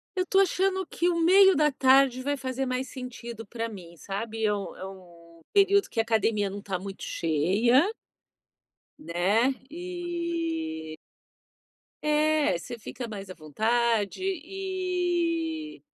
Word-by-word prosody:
Eu 370 - +1
estou 385 +1 +4
achando 380 0 +1
que 350 +1 0
o 335 - 0
meio 380 +3 +7
da 300 0 +3
tarde 260 -1 +4
vai 285 +2 -1
fazer 260 0 -3
mais 255 +1 -2
sentido 235 -3 -8
pra 230 +1 -3
mim, 175 -6 -11
sabe. 220 +5 -4
É 210 - +3
o 200 -4 -5
é 190 - -7
o 170 -3 -14
período 400 0 +4
que 230 - -3
a - - +4
academia 220 -2 +1
não 200 - -6
está 195 -2 -3
muito 195 +1 -8
cheia 190 - +2 1.2
né, 215 - +1 0.2
e 335 - -4 1.1
é, 300 - +2
você 235 +7 -8
fica 235 +2 -7
mais 200 -3 -7
à 185 - -6
vontade 220 - 0
e 355 -3 -2
255 Hz, 135 wpm, -27 LUFS, 200-335 Hz, 1.2 s, meio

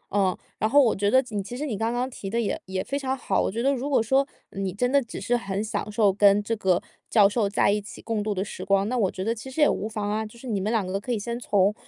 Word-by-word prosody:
嗯， 190 -3 +2 0.2
然 215 - +1
后 285 +4 +6
我 230 - +2
觉 205 +1 +1
得 260 +3 +5
你， 205 -2 -2
其 240 +5 -7
实 295 - -3
你 250 -8 -2
刚 225 +3 -1
刚 245 +1 -1
提 195 -5 -7
的， 230 - -1
也 225 - -1
也 190 0 -3
非 280 - -3
常 265 -1 -2
好， 195 -5 0
我 - - 0
觉 230 +4 -3
得 275 +1 +3
如 270 +2 -3
果 270 - +3
说， 265 +5 +2 0.3
你 195 -1 -3
真 245 +7 0
的 280 - +4
只 235 - -7
是 235 +5 0
很 200 -3 -2
享 215 -1 -3
受 205 -2 +3
跟 200 +1 +5
这 230 +2 -1
个 185 -4 +2 0.3
教 205 -3 +6
授 205 0 0
在 200 -1 +3
一 210 0 0
起 205 - -11
共 225 -2 -2
度 210 0 -2
的 195 0 -1
时 185 - -7
光， 195 +1 +2
那 250 - -1
我 200 -6 +2
觉 185 - -5
得 225 +2 0
其 235 +4 -9
实 265 - -7
也 295 - +7
无 215 - -1
妨 210 -2 -3
啊。 220 +1 0
就 220 +2 -10
是 260 - -13
你 210 -5 -1
们 215 +3 -1
两 220 -5 +1
个 190 +2 -2
可 245 - -5
以 230 - +1
先 235 +3 -4
从， 205 -3 +2
215 Hz, 335 characters per minute, -25 LUFS, 200-240 Hz, 0.3 s, 也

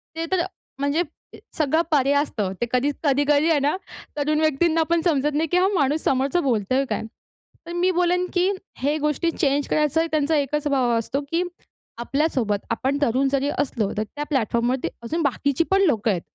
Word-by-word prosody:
ते 325 0 -2
तर 375 -2 +2 0.4
म्हणजे 285 +4 +1 0.6
सगळं 315 +1 +2
परे 280 -2 +3
असतं. 210 -10 -2
ते - - +2
कधीच 275 +3 +1
कधी-कधी 290 +2 +3
आहे 315 -3 +3
ना, 285 +4 +1 0.4
तरुण 300 +1 +1
व्यक्तींना 315 +2 +2
पण 340 0 +2
समजत 300 -4 +1
नाही 315 +2 +1
की 355 - +3
हा 370 +1 +4
माणूस 295 -1 +1
समोरचं 275 +6 +1
बोलतोय 255 +1 +1
काय! - - -2 0.6
तर 340 - -6
मी 355 +2 +2
बोलेन 360 +1 +2
की 360 +1 +2 0.3
हे 290 +4 0
गोष्टी 300 +2 0
चेंज 285 -2 0
करायचा 305 +2 +1
त्यांचा 310 0 +1
एकच 295 +1 -1
भाव 260 -4 +2
असतो 255 +5 -2
की 335 +2 +1 0.6
आपल्यासोबत, 260 -5 0
आपण 265 +5 0
तरुण 270 0 +2
जरी 275 0 0
असलो, 230 -7 -1
तर 215 - +1
त्या 290 +7 -6
प्लॅटफॉर्मवरती 245 -1 0 0.2
अजून 320 +9 -2
बाकीची 280 +2 +1
पण 390 0 +4
लोकं 230 - +2
आहेत 180 -4 -1
285 Hz, 175 wpm, -23 LUFS, 265-320 Hz, 0.6 s, हा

